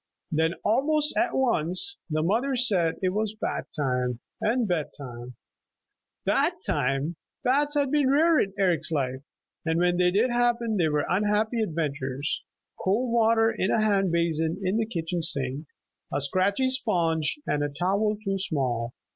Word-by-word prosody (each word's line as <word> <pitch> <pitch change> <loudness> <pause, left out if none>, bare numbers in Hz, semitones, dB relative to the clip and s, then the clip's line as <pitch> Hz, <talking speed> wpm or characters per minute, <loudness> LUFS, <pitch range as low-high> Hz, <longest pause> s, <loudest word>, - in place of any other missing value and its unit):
Then 160 +2 +1
almost 300 +7 +2
at 350 - +1
once 255 - +1
the 155 0 0
mother 235 +10 +1
said 190 -10 +2
it 185 - +3
was 215 +2 -2
bath - - -3
time 125 -4 -1 0.2
and 230 +1 +1
bed 170 -5 -1
time. 125 -3 -9 0.9
Bath - - +1
time! 135 +5 -1 0.3
Baths 290 +4 +2
had 285 -2 +1
been 290 -3 +3
rare 315 +3 +4
in 195 - 0
Eric's 185 -4 +1
life, 130 -3 -1 0.4
and 160 0 0
when 175 0 +2
they 180 0 +4
did 215 +7 +2
happen 240 -2 +1
were 150 -3 +1
unhappy 210 +4 +1
adventures, 145 -6 -2 0.4
cold 230 +6 +1
water 225 -1 +4
in 190 - -1
a - - +2
hand 200 -4 +2
basin 165 0 0
in 190 +3 0
the 225 -1 0
kitchen 170 -4 -3
sink, 145 -2 -1 0.4
a 140 - 0
scratchy 185 - +1
sponge, 175 - +1
and 145 - 0
a 145 - -1
towel 195 +8 0
too 195 0 -1
small. 125 -9 -2
185 Hz, 155 wpm, -26 LUFS, 155-230 Hz, 0.9 s, rare